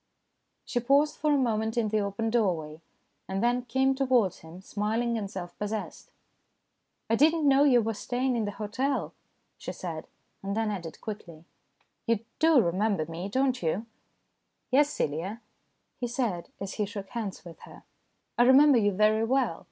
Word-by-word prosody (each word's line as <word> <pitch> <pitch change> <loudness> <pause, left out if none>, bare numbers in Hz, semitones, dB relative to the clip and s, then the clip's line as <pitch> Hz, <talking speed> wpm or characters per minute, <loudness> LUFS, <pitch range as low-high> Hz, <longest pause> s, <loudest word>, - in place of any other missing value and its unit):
She 245 - -1
paused 280 +5 +3
for 305 -1 +1
a 290 - +4
moment 225 -3 0
in 225 -2 +1
the 215 0 +1
open 200 +3 -2
doorway, 165 -9 0 0.5
and 190 +2 -2
then 245 +1 +1
came 265 +2 +2
towards 255 -8 +2
him, 160 +3 -12
smiling 220 +4 -1
and 205 -3 -3
self 175 -3 -7
possessed. 210 0 -5 0.5
" - - -51
I - - +5
did 305 +7 +5
not 325 -2 -1
know 280 0 +5
you 245 -5 +5
were 225 +1 -1
staying 250 +4 -1
in 225 -2 0
the 205 - -3
hotel," 255 +6 -2 0.5
she - - -5
said, 165 -3 -6 0.3
and 200 +2 -3
then 225 -1 0
added 170 -5 -6
quickly: 170 -7 -8 0.3
" - - -43
You 230 -1 +1
do 320 -3 +5
re 170 - +1
member 195 -3 0
me, 165 +4 -6
don't 260 +3 +1
you? 175 +7 -1 0.4
" - - -50
"Yes, 285 +3 +4
Celia," 180 - -3 0.6
he 245 - -1
said 230 -8 -2
as 195 -1 -5
he 210 - -1
shook 200 -2 -7
hands 210 -5 -5
with 170 -1 -11
her. - - -14 0.3
" - - -49
I - - +7
remember 265 0 +7
you 205 -2 +2
very 215 +3 +3
well. 245 -7 +1
220 Hz, 185 wpm, -28 LUFS, 195-255 Hz, 0.6 s, I